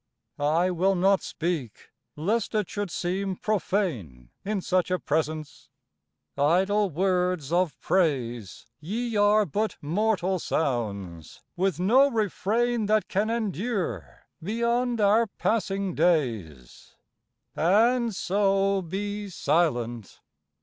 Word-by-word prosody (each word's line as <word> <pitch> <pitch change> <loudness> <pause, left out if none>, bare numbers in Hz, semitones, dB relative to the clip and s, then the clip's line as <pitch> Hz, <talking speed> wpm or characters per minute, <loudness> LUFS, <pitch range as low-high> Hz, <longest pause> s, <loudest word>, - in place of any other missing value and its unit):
I 160 +5 +2
will 190 +3 +2
not 190 +2 +3
speak, 160 -9 -4 0.2
lest 210 +9 -1
it 210 -4 +1
should 205 -2 -4
seem 185 +3 -2
profane 160 - -2
In 210 0 -1
such 185 0 0
a 185 - +1
presence; 155 -2 -3 0.7
idle 190 +8 +2
words 180 -3 0
of 180 -3 +1
praise 120 - -1
Ye 225 +9 -3
are 205 +1 +4
but 210 +6 -2
mortal 190 +3 0
sounds, 100 - -3
with 185 0 0
no 255 +10 +5
refrain 225 +1 0
That 215 0 +1
can 205 +3 0
endure 200 - -3 0.2
beyond 235 +5 0
our 215 +3 +4
passing 200 -3 -1
days, 115 - -1 0.6
And 225 +6 +3
so 195 0 +1
be 205 +3 -4
silent! 120 - -1
185 Hz, 105 wpm, -26 LUFS, 155-210 Hz, 0.7 s, no